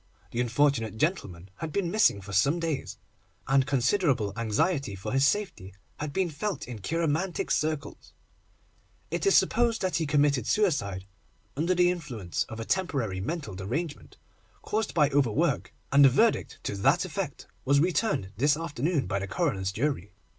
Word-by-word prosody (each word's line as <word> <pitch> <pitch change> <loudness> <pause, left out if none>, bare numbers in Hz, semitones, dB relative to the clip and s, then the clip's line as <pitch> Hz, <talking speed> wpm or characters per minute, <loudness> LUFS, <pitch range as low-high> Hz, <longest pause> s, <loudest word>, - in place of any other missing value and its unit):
The 120 - -1
unfortunate 120 -3 +1
gentleman 100 - -2
had 160 -1 -5
been 175 0 -1
missing 210 - +3
for 95 0 -9
some 140 - +3
days, 165 -4 -3 0.5
and 135 0 +3
considerable 130 - +1
anxiety 115 - 0
for 95 - -6
his 135 +1 +4
safety 140 - -2 0.2
had 150 -1 -4
been 180 +2 0
felt 195 +3 -4
in 120 -3 -7
cheiromantic 165 - -1
circles. 155 -1 -2 1.0
It - - -1
is 395 - +6
supposed 230 -2 +2
that 185 -4 +1
he 160 -2 -1
committed 145 -4 +2
suicide 100 - 0 0.5
under 170 +5 +1
the 180 0 +4
influence 125 - -4
of 115 -1 -7
a 115 - -4
temporary 135 - -1
mental 150 - -4
derangement, 140 - -5 0.5
caused 220 +1 -2
by 150 -3 +4
overwork, 135 -6 +1 0.2
and 140 +1 +6
a 135 - +9
verdict 220 - +2
to - - -3
that 100 - +3
effect - - -5 0.2
was 140 +1 +3
returned 175 - 0
this 145 +5 +3
afternoon 155 -2 -1
by 100 +1 -1
the 100 - -4
coroner's 95 - -1
jury. 105 - -2
140 Hz, 155 wpm, -28 LUFS, 110-170 Hz, 1.0 s, a